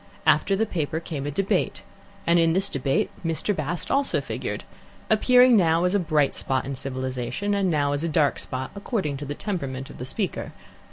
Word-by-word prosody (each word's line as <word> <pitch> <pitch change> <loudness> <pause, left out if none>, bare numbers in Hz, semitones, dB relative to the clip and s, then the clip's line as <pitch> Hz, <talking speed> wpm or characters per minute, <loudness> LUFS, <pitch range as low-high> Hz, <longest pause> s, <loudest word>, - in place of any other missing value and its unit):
After 195 - +4
the 220 +3 +1
paper 160 -5 -2
came 150 -4 -5
a - - 0
debate, 190 +7 0 0.4
and 170 +1 +4
in 165 -1 +4
this 195 +2 +2
debate 135 0 0
Mr. 165 +5 -1
Bast 160 +2 -3
also 275 0 +2
figured, - - -4 0.5
appearing 250 +3 +6
now 165 -4 +4
as 180 +1 +2
a 205 - +3
bright 155 -5 +2
spot 130 -1 -1
in 140 - -3
civilization, 130 +6 -3 0.2
now 145 -3 +1
as 145 +2 -1
a 170 - 0
dark 150 -3 +2
spot, 130 0 -5
according 200 - -2
to 145 - -6
the 145 +1 -4
temperament 135 -10 -4
of - - -12
the 125 - -4
speaker. 190 +7 -3
160 Hz, 185 wpm, -25 LUFS, 140-195 Hz, 0.5 s, appearing